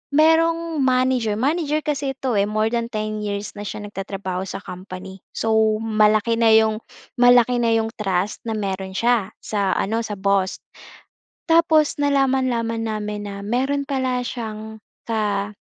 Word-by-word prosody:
merong 330 Hz, +1 st, +3 dB
manager, 255 Hz, -4 st, +2 dB
manager 300 Hz, +3 st, +1 dB
kasi 285 Hz, -2 st, -1 dB
ito, 260 Hz, -3 st, -2 dB
eh, -, -, +4 dB
more 215 Hz, +1 st, +1 dB
than 235 Hz, -1 st, -1 dB
10 215 Hz, -1 st, -3 dB
years 205 Hz, 0 st, -3 dB
na 205 Hz, -, -6 dB
siya -, -, -5 dB
nagtatrabaho 195 Hz, -2 st, -4 dB
sa 195 Hz, -, -5 dB
company. 185 Hz, +1 st, -9 dB
So, 220 Hz, -1 st, +2 dB
malaki 215 Hz, 0 st, +2 dB
na 230 Hz, -1 st, +5 dB
'yong 220 Hz, 0 st, +3 dB, 0.4 s
malaki 245 Hz, 0 st, +6 dB
na 230 Hz, -, +3 dB
iyong 225 Hz, 0 st, +1 dB
trust 195 Hz, -1 st, -1 dB
na -, -, -1 dB
meron 190 Hz, -2 st, -3 dB
siya 230 Hz, -2 st, +1 dB
sa 200 Hz, -3 st, 0 dB
ano, 225 Hz, +3 st, 0 dB
sa 210 Hz, -2 st, -4 dB
boss. 195 Hz, -1 st, +1 dB, 0.9 s
Tapos 325 Hz, -2 st, +4 dB
nalaman-laman 260 Hz, -5 st, +1 dB
namin 210 Hz, -1 st, -3 dB
na 200 Hz, -1 st, -6 dB
meron 265 Hz, +7 st, -1 dB
pala 260 Hz, -2 st, 0 dB
siyang 220 Hz, -3 st, -6 dB, 0.2 s
ka 210 Hz, -2 st, -1 dB
220 Hz, 145 wpm, -22 LUFS, 205-255 Hz, 0.9 s, malaki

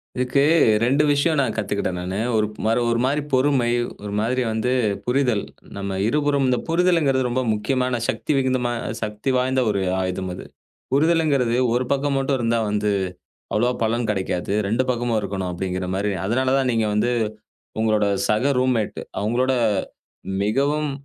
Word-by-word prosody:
இதுக்கு 125 Hz, +2 st, +1 dB, 0.4 s
2 135 Hz, +5 st, +3 dB
விஷயம் 145 Hz, +2 st, +2 dB
நான் 130 Hz, -5 st, 0 dB
கத்துக்கிட்டேன் 100 Hz, -4 st, -2 dB
நானு. 95 Hz, +3 st, -3 dB, 0.2 s
ஒரு 110 Hz, -1 st, +3 dB, 0.2 s
மறு 115 Hz, +2 st, +2 dB
ஒருமாரி 130 Hz, +5 st, +1 dB
பொறுமை 130 Hz, -2 st, +3 dB, 0.4 s
ஒருமாரி 110 Hz, +5 st, -1 dB
வந்து 110 Hz, +3 st, -1 dB, 0.3 s
புரிதல். 125 Hz, -4 st, +1 dB, 0.3 s
நம்ம 100 Hz, -1 st, -3 dB
இருபுறமும் 145 Hz, +1 st, +1 dB
இந்த 125 Hz, -1 st, +1 dB
புரிதல்ங்கிறது 165 Hz, -7 st, +2 dB
ரொம்ப 130 Hz, +2 st, 0 dB
முக்கியமான 125 Hz, +4 st, -1 dB
சக்தி. -, -, +1 dB
சக்தி -, -, -1 dB
விகிந்தமா 130 Hz, -2 st, 0 dB, 0.3 s
சக்தி 105 Hz, +3 st, -3 dB
வாய்ந்த 130 Hz, +1 st, +1 dB
ஒரு 100 Hz, -2 st, 0 dB, 0.2 s
ஆயுதம் 95 Hz, 0 st, -3 dB
அது. 90 Hz, -, -8 dB, 0.5 s
புரிதல்ங்கிறது 145 Hz, -4 st, +2 dB, 0.2 s
1 125 Hz, +1 st, +1 dB
பக்கம் 140 Hz, 0 st, +1 dB
மட்டும் 135 Hz, 0 st, 0 dB
இருந்தா 115 Hz, 0 st, +1 dB
வந்து 105 Hz, 0 st, 0 dB, 0.6 s
அவ்வளவா 120 Hz, +4 st, +2 dB
பலன் 115 Hz, +1 st, 0 dB
கிடைக்காது. 95 Hz, -3 st, -2 dB, 0.2 s
2 115 Hz, +5 st, +1 dB
பக்கமும் 120 Hz, -2 st, 0 dB
இருக்கணும் 95 Hz, -2 st, -3 dB
அப்பிடிங்கிறமாரி. 95 Hz, +2 st, -2 dB
அதனால 130 Hz, +5 st, +1 dB
தான் 135 Hz, -2 st, +1 dB
நீங்க 115 Hz, -2 st, +1 dB
வந்து 105 Hz, +4 st, +1 dB, 0.7 s
உங்களோட 110 Hz, -2 st, +2 dB, 0.2 s
சக 110 Hz, +7 st, +2 dB
ரூம்மெட் 125 Hz, -5 st, 0 dB, 0.2 s
அவுங்களோட 120 Hz, +5 st, +1 dB, 0.9 s
மிகவும் 145 Hz, +7 st, 0 dB
120 Hz, 140 wpm, -22 LUFS, 105-135 Hz, 0.9 s, 2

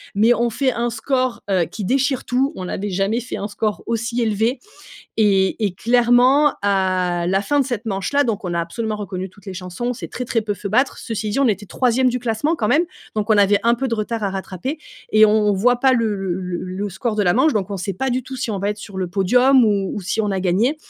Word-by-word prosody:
mais 225 Hz, +4 st, +5 dB
on 235 Hz, 0 st, 0 dB
fait 260 Hz, +3 st, +1 dB
un 235 Hz, +1 st, -1 dB
score, 255 Hz, +1 st, -1 dB
heu, 185 Hz, -3 st, +3 dB
qui 205 Hz, +4 st, -6 dB
déchire 270 Hz, +2 st, 0 dB
tout, 265 Hz, +3 st, +1 dB
on 185 Hz, -, -5 dB
n'avait 200 Hz, +2 st, -4 dB
jamais 200 Hz, +6 st, 0 dB
fait 245 Hz, -, -6 dB
un 205 Hz, -, -3 dB
score 210 Hz, -2 st, -2 dB
aussi 235 Hz, +1 st, -1 dB
élevé 225 Hz, +3 st, 0 dB, 0.6 s
et 200 Hz, 0 st, +2 dB
et 200 Hz, -, 0 dB
clairement, 245 Hz, +6 st, +4 dB
à 185 Hz, -3 st, +1 dB
la 190 Hz, +1 st, +2 dB
fin 290 Hz, +5 st, +1 dB
de -, -, +2 dB
cette 235 Hz, -3 st, -4 dB
manche-là, 220 Hz, +8 st, 0 dB
donc 210 Hz, -4 st, -2 dB
on 175 Hz, -, -2 dB
a 170 Hz, -, +1 dB
absolument 215 Hz, +6 st, -3 dB
reconnu 190 Hz, -2 st, -5 dB
toutes 200 Hz, +1 st, -21 dB
les 190 Hz, -, -6 dB
chansons, 180 Hz, +6 st, -5 dB
on 245 Hz, -, 0 dB
s'est -, -, -7 dB
très 250 Hz, -, -5 dB
très 230 Hz, -1 st, 0 dB
peu 210 Hz, -, -2 dB
fait 200 Hz, -, -6 dB
battre. 255 Hz, +6 st, +1 dB
Ceci 215 Hz, -2 st, -4 dB
dit 210 Hz, -, -1 dB
on 270 Hz, -, +4 dB
était 205 Hz, -1 st, -1 dB
3e 255 Hz, +2 st, +2 dB
du 250 Hz, -, -2 dB
classement, 245 Hz, +7 st, 0 dB
quand 215 Hz, -5 st, -1 dB
même, 325 Hz, +4 st, +3 dB, 0.3 s
donc 215 Hz, +1 st, -1 dB
on 215 Hz, -, +5 dB
avait 205 Hz, 0 st, +4 dB
un 235 Hz, +1 st, +4 dB
peu 265 Hz, +2 st, -2 dB
de 230 Hz, -, 0 dB
retard 220 Hz, +1 st, -3 dB
à -, -, +1 dB
rattraper 195 Hz, -, -4 dB, 0.4 s
et 215 Hz, 0 st, +7 dB
on 210 Hz, -, +3 dB, 0.2 s
on -, -, +4 dB
voit 245 Hz, +6 st, +3 dB
pas 265 Hz, -1 st, +4 dB
le 225 Hz, -3 st, +1 dB
le 190 Hz, -2 st, -2 dB
le 180 Hz, -1 st, -4 dB
le 190 Hz, +3 st, -4 dB
score 220 Hz, +3 st, -3 dB
de 205 Hz, -, +2 dB
la 175 Hz, -2 st, +3 dB
manche, 270 Hz, +2 st, +3 dB
donc 200 Hz, -1 st, -1 dB
on 200 Hz, -, -3 dB
sait 190 Hz, +1 st, -3 dB
pas 265 Hz, +5 st, -2 dB
du 255 Hz, +1 st, -1 dB
tout 260 Hz, +1 st, -8 dB
si 245 Hz, -2 st, -3 dB
on 200 Hz, -, -2 dB
va 200 Hz, +2 st, -1 dB
être 210 Hz, -, -5 dB
sur 200 Hz, -2 st, -8 dB
le 185 Hz, -, -1 dB
podium 245 Hz, +8 st, +4 dB
ou 200 Hz, -3 st, +1 dB
ou -, -, -4 dB
si 205 Hz, +4 st, -1 dB
on 210 Hz, -2 st, -1 dB
a 190 Hz, -, -1 dB
gagné 200 Hz, -, +1 dB
215 Hz, 260 wpm, -20 LUFS, 195-245 Hz, 0.6 s, et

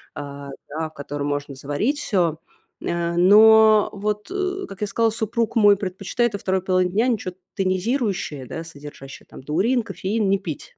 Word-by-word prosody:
а, 140 Hz, -1 st, -7 dB, 0.2 s
да, 155 Hz, +2 st, -4 dB
в -, -, -27 dB
котором 145 Hz, -1 st, -5 dB
можно 145 Hz, -1 st, -3 dB
заварить 145 Hz, -, -2 dB
всё. 170 Hz, -6 st, 0 dB, 0.4 s
Ня 170 Hz, 0 st, -2 dB
но 215 Hz, +3 st, +7 dB
вот, 210 Hz, -, -3 dB
э, 385 Hz, 0 st, -2 dB
как 195 Hz, -, -11 dB
я 210 Hz, -, 0 dB
сказала, 225 Hz, +2 st, +1 dB
супруг 230 Hz, +1 st, -2 dB
мой 205 Hz, -2 st, +6 dB
предпочитает 200 Hz, +5 st, -2 dB
во 200 Hz, -, -4 dB
2 190 Hz, 0 st, 0 dB
половине 185 Hz, -1 st, +1 dB
дня 220 Hz, +6 st, +2 dB
ничё 200 Hz, -6 st, -2 dB, 0.2 s
тонизирующее, 190 Hz, -, -1 dB
да, 165 Hz, +5 st, -6 dB
содержащее 145 Hz, -3 st, -11 dB
там -, -, -12 dB
таурин, 205 Hz, -, +1 dB
кофеин, 210 Hz, -1 st, -2 dB
не 195 Hz, -, +3 dB
пить. 165 Hz, -7 st, -8 dB
190 Hz, 165 wpm, -22 LUFS, 160-220 Hz, 0.4 s, но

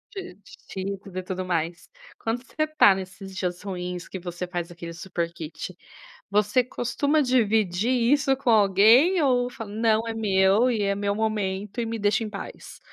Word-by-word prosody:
De 375 Hz, -2 st, -7 dB
de 200 Hz, -, -20 dB, 0.2 s
cheetos 195 Hz, 0 st, -5 dB
e 185 Hz, -, -3 dB
tudo 185 Hz, 0 st, -4 dB
mais. 170 Hz, -1 st, -2 dB, 0.3 s
Quando 230 Hz, +2 st, -2 dB
você 310 Hz, +4 st, -2 dB
está 310 Hz, -11 st, +5 dB
nesses 190 Hz, 0 st, -8 dB
dias 180 Hz, -1 st, -3 dB
ruins, 180 Hz, -3 st, -5 dB
que 190 Hz, -, -6 dB
você 175 Hz, 0 st, -5 dB
faz 175 Hz, -1 st, -4 dB
aquele 170 Hz, -1 st, -8 dB
super 170 Hz, -1 st, -4 dB
kit, 165 Hz, +2 st, -7 dB, 0.5 s
você 210 Hz, +4 st, +3 dB
costuma 280 Hz, +5 st, 0 dB
dividir 220 Hz, -5 st, +2 dB
isso 270 Hz, +2 st, +3 dB
com 260 Hz, -2 st, 0 dB
alguém 225 Hz, -, +5 dB
ou 250 Hz, -2 st, +2 dB
fala: 225 Hz, -4 st, -8 dB
“Não, 220 Hz, +1 st, +1 dB
é 225 Hz, -, -3 dB
meu 205 Hz, +2 st, +3 dB
e 220 Hz, -3 st, 0 dB
é 200 Hz, 0 st, +1 dB
meu 200 Hz, 0 st, -1 dB
momento 210 Hz, 0 st, -2 dB
e 230 Hz, -, -1 dB
me 225 Hz, 0 st, -3 dB
deixa 205 Hz, +2 st, +1 dB
em 210 Hz, -, -5 dB
paz?”. 200 Hz, -, -9 dB
205 Hz, 175 wpm, -25 LUFS, 185-235 Hz, 0.5 s, está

